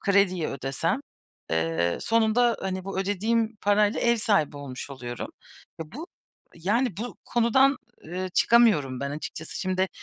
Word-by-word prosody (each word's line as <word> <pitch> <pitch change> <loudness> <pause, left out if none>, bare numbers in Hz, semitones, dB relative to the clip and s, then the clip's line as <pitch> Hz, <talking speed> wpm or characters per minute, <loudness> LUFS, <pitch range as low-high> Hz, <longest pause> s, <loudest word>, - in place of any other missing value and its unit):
krediyi 195 -4 +2
ödesem, 135 - -2 0.5
eee, 80 +1 0
sonunda, 230 +1 +3
hani, 190 -1 -3
bu 195 0 -4
ödediğim 215 +3 0
parayla 205 +1 +3
ev 235 0 +3
sahibi 205 -10 +1
olmuş, 140 -1 -7
oluyorum. 120 -3 -6 0.5
Ya, 160 0 -8
bu, 305 +8 -7 0.5
yani, 205 +5 0
bu 240 +4 -5
konudan, 260 +4 +3 0.3
eee, 185 +3 -4
çıkamıyorum 175 - +4
ben 140 0 -2
açıkçası. 155 +2 -6
Şimdi 185 0 0
190 Hz, 130 wpm, -26 LUFS, 150-230 Hz, 0.5 s, çıkamıyorum